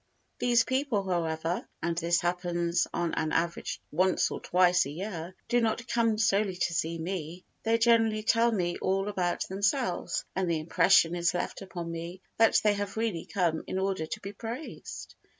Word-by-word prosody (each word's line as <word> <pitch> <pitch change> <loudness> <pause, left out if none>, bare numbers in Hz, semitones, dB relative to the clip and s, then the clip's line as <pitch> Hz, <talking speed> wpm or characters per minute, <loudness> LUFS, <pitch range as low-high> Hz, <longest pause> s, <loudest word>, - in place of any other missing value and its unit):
These 240 -1 +4
people 260 -6 0
however 165 -1 -1 0.2
(and 170 0 0
this 170 0 +1
happens 175 0 0
on 170 -1 -1
an 155 -1 -1
average 170 +1 -1
once 185 +4 +2
or - - -4
twice 180 -3 +3
a - - -6
year) 175 +1 -6
do 240 0 +2
not 230 +1 -1
come 230 -2 +2
solely 210 -3 +2
to 175 -1 -1
see 165 0 -1
me, 170 0 -5 0.2
they 225 +1 +2
generally 225 -2 +3
tell 230 +1 +3
me 175 -5 -1
all 195 +1 0
about 180 -3 -1
themselves 200 +2 -1
and 185 -2 0
the 165 - +1
impression 165 +1 +4
is 175 0 +1
left - - -3
upon 175 -3 -6
me 170 +2 -6 0.2
that 225 0 +5
they 210 -1 +4
have 205 0 -4
really 220 -7 -1
come 170 -4 0
in - - -3
order 190 -4 -1
to 215 - -5
be 200 0 -7
praised. 230 +8 -7
185 Hz, 175 wpm, -29 LUFS, 170-215 Hz, 0.2 s, that